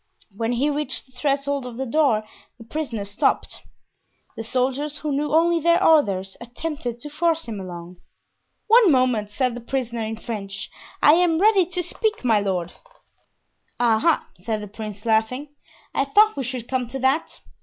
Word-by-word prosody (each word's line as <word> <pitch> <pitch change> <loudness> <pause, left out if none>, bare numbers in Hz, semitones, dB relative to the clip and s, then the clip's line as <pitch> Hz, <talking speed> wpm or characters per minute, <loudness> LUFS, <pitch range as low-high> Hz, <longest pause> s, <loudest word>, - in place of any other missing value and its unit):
When 225 +3 -1
he 275 +5 +1
reached 290 -3 -3
the 260 - -26
threshold 280 +1 -1
of 245 -2 -8
the 265 - -2
door 260 -5 +2 0.3
the 235 - -12
prisoner 230 -5 -4
stopped. 200 +1 0 0.8
The 225 - -5
soldiers, 265 +5 -1
who 300 -1 -3
knew 290 +1 -1
only 335 +2 +4
their 340 +3 +3
orders, 195 - +3
attempted 240 0 -5
to 295 - -6
force 330 +1 0
him 215 -3 -5
along. 175 -1 -8 0.7
"One 445 -4 +6
moment," 250 -6 +2
said 250 +3 0
the 240 - -7
prisoner, 235 -2 -3
in 220 0 -4
French. 195 -4 -6 0.3
"I 295 - +8
am 340 -1 +3
ready 390 -1 +4
to 360 0 -2
speak, 430 - -2
my 225 -3 +4
lord." 185 -3 -2 1.1
"Ah! 230 -2 +3
ah!" 335 -2 +2
said 215 +1 -3
the - - -7
prince, 210 0 -8
laughing, 230 +6 +1 0.4
"I 275 - +1
thought 425 +9 +4
we 270 - -3
should 250 -1 -5
come 255 -2 -1
to 255 +3 -5
that. 270 +4 0
255 Hz, 170 wpm, -23 LUFS, 220-300 Hz, 1.1 s, I